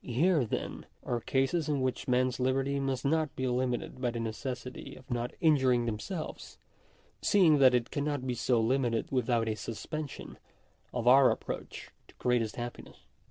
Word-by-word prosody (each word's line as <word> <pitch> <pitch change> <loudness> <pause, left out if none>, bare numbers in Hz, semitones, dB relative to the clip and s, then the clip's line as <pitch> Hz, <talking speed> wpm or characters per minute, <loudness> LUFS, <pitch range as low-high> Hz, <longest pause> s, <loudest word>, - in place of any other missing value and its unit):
Here, 145 +3 +2
then, - - -4 0.2
are 120 - -1
cases 140 +6 0
in 145 -3 0
which 130 -1 -2
men's 125 0 +1
liberty 135 +2 +1
must 135 -1 -2
not 155 +1 +1
be 130 - -2
limited 125 0 -1
by 125 - +1
the 120 - -5
neces 120 +3 -4
sity 125 - -9
of 130 - -14
not 120 0 -1
injuring 130 -7 +4
themselves; 120 - -5 0.6
seeing 170 -8 +5
that 130 -2 +6
it 120 -1 -1
cannot 145 -2 -2
be 125 - -1
so 120 0 +1
limited 120 0 0
without 120 -3 +1
a 110 - +1
suspension 130 +8 -6 0.5
of 120 -1 -3
oiir 130 +1 +7
approach - - -6 0.2
to - - -20
greatest 120 -3 0
happi 120 0 -6
ness. - - -16
130 Hz, 165 wpm, -30 LUFS, 120-140 Hz, 0.6 s, oiir